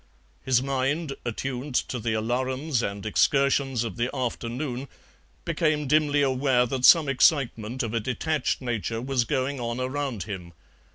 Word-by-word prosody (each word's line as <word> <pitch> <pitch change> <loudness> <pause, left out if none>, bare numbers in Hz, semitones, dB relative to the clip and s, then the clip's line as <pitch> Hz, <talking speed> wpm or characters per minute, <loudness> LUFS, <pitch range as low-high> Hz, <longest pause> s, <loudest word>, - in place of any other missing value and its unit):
His 130 -1 +2
mind, 135 +3 -1
attuned 125 +3 -4
to 125 - 0
the 110 0 -1
alarums 130 +4 -1
and 100 -1 -4
excursions 135 +2 +2
of 115 - -5
the 120 +1 0
afternoon, 125 +1 -3 0.6
became 155 -3 0
dimly 145 0 +3
aware 130 -2 +2
that 130 +1 0
some 165 -4 +7
excitement 130 -3 +2
of 115 -1 -4
a 115 - +1
detached 130 +7 -1
nature 115 -2 -2
was 125 0 0
going 135 +1 -1
on 120 0 -3
around 130 -5 -2
him. 90 -4 -7
130 Hz, 145 wpm, -26 LUFS, 120-140 Hz, 0.6 s, some